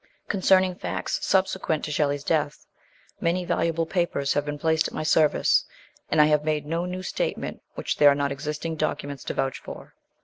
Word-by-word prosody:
Concerning 190 -1 +3
facts - - -3
subsequent 190 -4 +1
to 150 - -4
Shelley's 145 -1 0
death, 150 -1 -1 0.5
many 175 +2 0
valuable 165 -1 0
papers 165 -5 0
have 145 - +1
been 145 0 -4
placed 160 +1 +1
at - - -9
my - - -2
service, 155 -1 +3 0.5
and 155 - +1
I 150 - +8
have 150 -1 +3
made 150 -1 -1
no 165 +3 -2
new 180 +1 -5
statement - - -3
which - - -2
there 145 - +7
are 140 - +4
not 140 0 -1
existing 150 +3 -4
documents 145 -3 -3
to - - -4
vouch 135 -1 -1
for. - - -10
155 Hz, 180 wpm, -25 LUFS, 145-170 Hz, 0.5 s, I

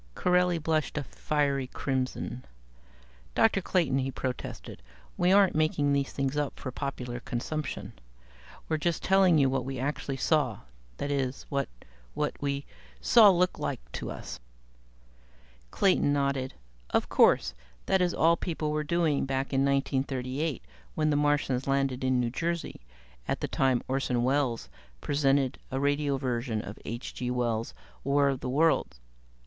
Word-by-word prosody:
Corelli 180 -1 +2
blushed 155 -2 -1
a 150 - -1
fiery 140 0 -1
crimson. 130 -1 -3 0.9
"Dr. 215 -3 +4
Clayton," 165 -8 +1
he 135 0 -1
protested, 130 - -5 0.3
"we 180 +1 +2
aren't 195 -1 +5
making 155 -2 +2
these 140 -1 0
things 135 0 -2
up 145 -2 -2
for 130 - -5
popular 125 -3 -4
consumption. 140 +5 -4 0.7
We're 155 - 0
just 170 +2 -1
telling 190 -3 +5
you 140 -2 +4
what 130 -1 0
we 135 +1 -5
actually 135 +1 -2
saw 135 -6 +1 0.4
that 145 - -3
is 135 -1 -2
what 140 -1 -1 0.5
what - - -1
we 140 0 -2 0.3
saw 220 - +7
looked 180 -1 +2
like - - -2
to - - -5
us." - - -7 1.3
Clayton 185 - +3
nodded. 140 -2 0 0.3
"Of - - +1
course. - - +4 0.3
That 190 - +2
is 180 -1 +2
all 165 +2 +4
people 160 -3 -3
were 150 0 0
doing 160 -3 +1
back 135 +1 -2
in 135 0 +3
1938 135 +1 -1 0.3
when 155 -1 +2
the - - +2
Martians 145 -3 +1
landed 135 -2 0
in 130 -1 +2
New 120 -1 0
Jersey, 170 - -3 0.5
at - - -1
the - - -2
time 130 -2 +1
Orson 130 -2 0
Welles 130 - 0 0.3
presented 140 - +1
a 130 - -2
radio 145 0 +1
version 120 -3 -2
of 100 0 -7
H. 120 +2 -5
G. 125 -1 -3
Wells' 120 -2 -1 0.3
'War 140 0 +3
of 135 -2 -1
the 130 - -4
Worlds'. 145 - +2
140 Hz, 150 wpm, -29 LUFS, 130-155 Hz, 1.3 s, saw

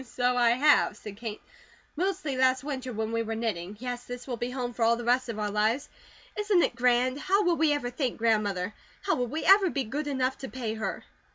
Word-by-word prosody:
"So 250 0 +2
I 240 -1 +4
have," 270 -5 +4
said 205 -1 -9
Kate. 220 -2 -6 0.5
"Mostly 350 -4 -1
last 260 0 +3
winter 265 -3 -4
when 220 -1 -3
we 230 0 0
were 225 0 -3
knitting. 205 -4 -3
Yes, 245 0 -4
this 245 0 -7
will 255 - -3
be 240 +1 -3
home 250 -1 -4
for 235 - -1
all 230 +1 +4
the 240 - -6
rest 245 +1 +1
of 225 - -4
our 210 -1 -2
lives. 220 +7 0 0.5
Isn't 415 -4 +2
it - - 0
grand? 250 +2 +2
How 390 +6 +2
will 350 -2 +3
we 315 -1 +3
ever 285 -4 -1
thank 250 -1 -2
Grandmother? 210 -4 0 0.3
How - - +1
will 245 -1 -1
we 310 +7 -4
ever 390 -1 +6
be 275 -4 -1
good 290 +6 -4
enough 265 -2 -1
to 265 - -6
pay 235 -4 -4
her?" 215 -3 -4
245 Hz, 225 wpm, -28 LUFS, 225-280 Hz, 0.5 s, ever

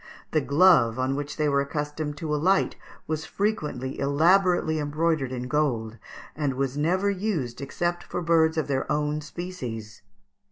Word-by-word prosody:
The 155 - +2
glove 140 -6 +5
on 130 +1 0
which 145 +1 -5
they 155 -1 +1
were 140 -1 +2
accustomed 150 +1 -3
to 155 0 -3
alight 185 +6 +2 0.3
was 155 0 -2
frequently 150 - -2
elaborately 165 +2 +3
embroidered 150 -2 0
in 125 -1 -4
gold, 120 -6 -1 0.4
and 145 -3 -1
was 135 0 -1
never 185 +7 +1
used 180 - -2
except 175 +5 -2
for 180 - -4
birds 160 -1 +3
of 155 - 0
their 135 -1 -1
own 150 0 0
species. 130 -10 -7
150 Hz, 150 wpm, -26 LUFS, 135-170 Hz, 0.4 s, glove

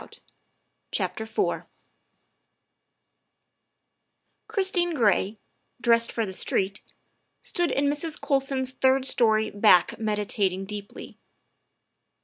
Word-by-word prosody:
40 - - -15 0.7
THE - - 0
WIFE - - -3
OF 220 0 -7 0.2
IV - - -27 2.8
CHRISTINE 380 -5 0
GRAY, 210 -3 +2 0.4
dressed 230 -1 +3
for 230 - -1
the 190 - -7
street, 190 +1 -1 0.6
stood 350 -2 +1
in 280 - 0
Mrs. 295 +2 -1
Colson's 270 -2 -1
third 260 0 +2
story 220 -4 +2
back 205 -4 +4
meditating 205 -3 -1
deeply. 205 0 -9
230 Hz, 100 wpm, -25 LUFS, 205-275 Hz, 2.8 s, back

